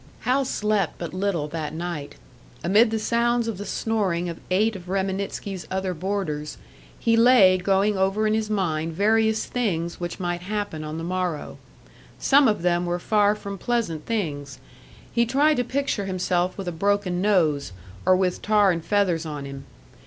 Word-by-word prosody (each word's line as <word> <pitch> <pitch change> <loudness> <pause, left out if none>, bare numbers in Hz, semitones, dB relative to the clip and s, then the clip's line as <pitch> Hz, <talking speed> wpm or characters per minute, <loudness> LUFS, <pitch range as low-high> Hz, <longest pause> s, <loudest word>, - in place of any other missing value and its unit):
Hal 265 +2 +1
slept 210 -7 0
but 170 -1 -6
little 185 -5 -1
that 155 -1 -4
night. 165 -4 -5 0.5
Amid 210 +6 +5
the 220 - -1
sounds 235 +1 +1
of 215 -4 -4
the 205 - -6
snoring 190 -7 -1
of 165 - -7
eight 210 +4 +2
of 180 -2 -9
Reminitsky's 195 0 -3
other 190 0 -2
boarders, 175 -4 -3 0.4
he 230 - +2
lay 230 -5 +6
going 195 +3 +2
over 195 +3 +1
in 215 - +2
his 220 -1 -1
mind 165 -6 -1
various 220 +4 +2
things 170 -9 -2
which 175 -1 -5
might 175 -1 -2
happen 205 -5 -4
on 155 +1 -5
the 165 - -5
morrow. 180 -3 -3 0.6
Some 280 0 +5
of 210 -6 0
them 175 0 +1
were 175 0 0
far 205 +3 +2
from 200 -2 -7
pleasant 215 -11 -2
things; 145 - -3 0.6
he 235 - +3
tried 290 +6 +3
to 245 - +2
picture 255 -5 -1
himself 185 -1 -1
with 195 -2 -5
a - - -1
broken 185 +1 0
nose, 160 - +2 0.3
or 185 - +5
with 185 -1 0
tar 210 -2 +4
and 165 -2 -3
feathers 180 -3 +1
on 145 -2 -5
him. 140 0 -8
190 Hz, 170 wpm, -24 LUFS, 170-215 Hz, 0.6 s, lay